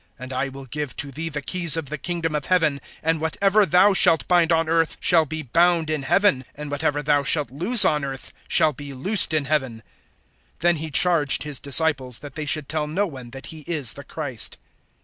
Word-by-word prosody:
(19)And 130 +1 -8
I 135 +2 -2
will 135 0 -11
give 145 +2 -5
to 140 -1 -5
thee 160 +4 -5
the 145 -2 -5
keys 170 0 +1
of 155 -5 -5
the 155 - -5
kingdom 170 0 -3
of 150 -1 -3
heaven; 160 -6 +1 0.2
and 160 0 0
whatever 195 +5 +1
thou 190 +3 +4
shalt 165 -4 +4
bind 175 -2 +2
on 165 -1 +1
earth 165 0 0
shall 165 -3 +2
be 160 +1 -5
bound 165 +3 +1
in 155 -2 -2
heaven; 140 -2 +1
and 150 0 -8
whatever 145 0 -2
thou 145 0 +2
shalt 145 -3 0
loose 185 - +6
on 150 -2 +1
earth 135 -1 -7
shall 155 - +3
be 140 +1 -10
loosed 190 +8 +1
in 155 -2 0
heaven. 130 -6 -2 0.8
(20)Then 175 0 +2
he 160 +1 -6
charged 155 -1 +2
his 150 -2 -3
disciples, 140 -4 +1
that 145 -1 -10
they 155 +1 -6
should 150 -1 0
tell 155 -1 -3
no 185 +7 -1
one 130 -9 -10
that 135 +3 -11
he 160 - -11
is 145 - +1
the 140 - -11
Christ. 140 -8 -4
150 Hz, 210 wpm, -22 LUFS, 140-165 Hz, 0.8 s, loose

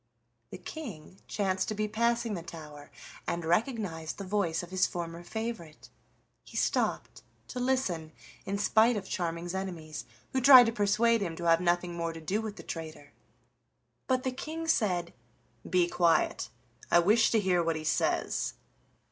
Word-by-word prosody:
The - - -8
King 190 - -8
chanced 190 -2 -1
to 215 - -2
be 215 +1 -1
passing 235 +1 0
the 175 - -4
tower 150 -3 -10 0.4
and 170 -1 -2
recognized 175 - -1
the 200 - -5
voice 185 -4 0
of 175 - -10
his 185 -1 +2
former 170 -1 -5
favorite. 220 -7 -6 0.5
He - - -9
stopped - - 0 0.3
to 250 - -5
listen 245 -12 0 0.3
in 200 +1 -2
spite 220 +3 +4
of 195 -2 -5
Charming's 170 0 -3
enemies, 165 -9 -5 0.3
who 260 - +1
tried 255 -1 +10
to 230 - +1
persuade 225 +2 +2
him 170 -4 -2
to 170 - -7
have 165 +1 +4
nothing 175 0 +1
more 170 -1 -3
to 165 - -8
do 190 +7 -1
with 215 -2 -5
the - - -10
traitor. 155 -3 -7 0.9
But 255 0 +1
the 260 - 0
King 315 +5 -5
said: 180 - +1 0.6
"Be 180 -1 +3
quiet, 170 -1 +2 0.4
I - - +5
wish 210 +6 +5
to 225 - +3
hear 185 -3 +2
what 165 -1 0
he 155 - -4
says." - - 0
185 Hz, 165 wpm, -30 LUFS, 165-225 Hz, 0.9 s, tried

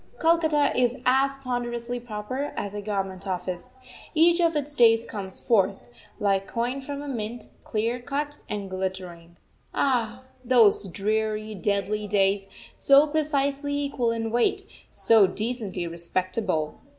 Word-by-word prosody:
Calcutta 320 -3 +3
is 250 0 +2
as 270 +2 +3
ponderously 245 -2 -3
proper 240 +4 -5
as 205 -1 -3
a 205 - -4
Government 195 -2 -3
office. 180 +3 -4 0.4
Each 340 +2 +5
of 335 -1 +2
its 295 0 -1
days 230 -3 +5
comes 195 -3 -7
forth, 200 -4 +2 0.4
like 195 -1 +1
coin 245 +4 -2
from 285 +1 -6
a - - -7
mint, 235 -2 -5
clear 230 +3 -1
cut 290 +3 -4
and 205 -2 -3
glittering. 185 -3 -5 0.4
Ah! 245 -2 0 0.2
those 230 -5 +4
dreary, 215 +3 -1
deadly 205 +2 -1
days, 195 -1 +1 0.2
so 280 +1 +5
precisely 285 -2 0
equal 280 -4 0
in 225 -1 -2
weight, 240 +1 +1 0.3
so 220 -4 +4
decently 210 -3 -3
respectable! 170 0 -2
225 Hz, 130 wpm, -26 LUFS, 195-270 Hz, 0.4 s, Each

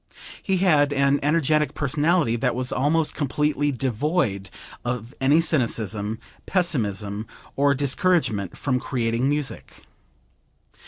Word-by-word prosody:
He 190 -1 0
had 150 -6 +3
an 140 0 +2
energetic 150 0 +1
personality 150 -1 +1
that 115 - 0
was 125 0 -2
almost 155 +4 +1
completely 145 0 0
devoid 125 - -1 0.3
of 120 0 -4
any 140 +4 +4
cynicism, 110 - 0 0.3
pessimism 110 - -1 0.3
or 140 0 +3
discouragement 135 - +1
from 130 -3 -1
creating 120 0 -1
music. 145 -1 -4
140 Hz, 105 wpm, -23 LUFS, 115-150 Hz, 0.3 s, any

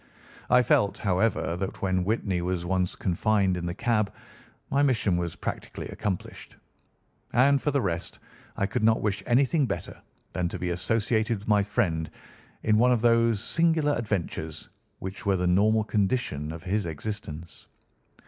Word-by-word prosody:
I 125 0 +6
felt, 100 -3 +2
however, 95 -3 +1
that 95 +1 -5
when 95 -1 +1
Whitney 95 -3 0
was 90 -1 -2
once 90 0 0
confined 95 +1 +1
in 85 -1 -3
the 85 - -3
cab 110 -2 +1 0.6
my 140 - +3
mission 120 -9 +2
was 85 -1 -2
practically - - -5
accomplished; 100 -4 -5 0.8
and 135 +3 +4
for - - 0
the 140 -2 +1
rest, 85 -2 -3 0.4
I 100 - +1
could 100 - -2
not 110 0 +3
wish 105 -2 0
anything 135 +4 +3
better 100 - -5 0.3
than 90 -1 -1
to - - -5
be 90 0 -2
associated 110 +5 +1
with 100 - -12
my 105 -1 +4
friend 85 -5 0 0.5
in 105 -1 +3
one 125 +2 +5
of 120 -3 +2
those 115 -2 +3
singular 160 -2 +2
adventures 100 -7 -3 0.3
which 95 +1 -7
were 100 -1 +3
the 90 - -1
normal 105 +5 +3
condition 100 - -1
of 80 +1 -8
his 95 0 -1
existence. 85 -1 -6
100 Hz, 160 wpm, -27 LUFS, 90-115 Hz, 0.8 s, I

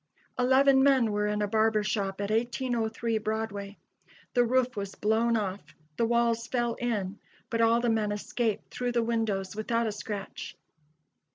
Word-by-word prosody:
Eleven 265 +2 +5
men 265 -5 +4
were 210 0 0
in 210 0 0
a - - 0
barber 220 0 +2
shop 200 -2 -2
at 200 +1 -2
1803 230 -1 -1
Broadway. 210 -2 -4 0.6
The 245 - +4
roof 255 +1 +1
was 200 -1 -5
blown 225 +2 +2
off; 200 -2 -4 0.2
the 230 - +1
walls 235 0 +1
fell 240 -2 0
in, 210 -5 -2 0.3
but 230 -1 +1
all 230 +1 +4
the 240 - 0
men 220 -2 +1
escaped 215 +1 -2
through 245 -1 -2
the 235 -1 +2
windows 215 -5 -1
without 230 +2 0
a 220 - 0
scratch. 205 -1 -6
225 Hz, 160 wpm, -28 LUFS, 210-235 Hz, 0.6 s, Eleven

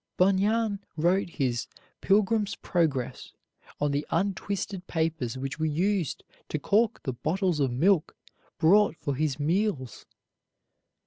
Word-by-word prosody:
Bunyan 200 +3 +2 0.2
wrote 175 +4 +2
his 130 -7 -1 0.3
"Pilgrim's 205 +1 +2
Progress" 150 -9 -1 0.5
on 145 -1 +1
the 140 +1 0
untwisted 195 +1 -2
papers 160 -7 -1
which 135 +3 -5
were 160 - +1
used 175 +1 0 0.3
to - - -1
cork 210 +9 +1
the 130 - -2
bottles 175 +5 0
of 135 -2 +2
milk 165 +6 +2 0.4
brought 195 +4 +4
for 145 -1 -2
his 145 0 -1
meals. 160 - -1
170 Hz, 120 wpm, -27 LUFS, 145-200 Hz, 0.5 s, brought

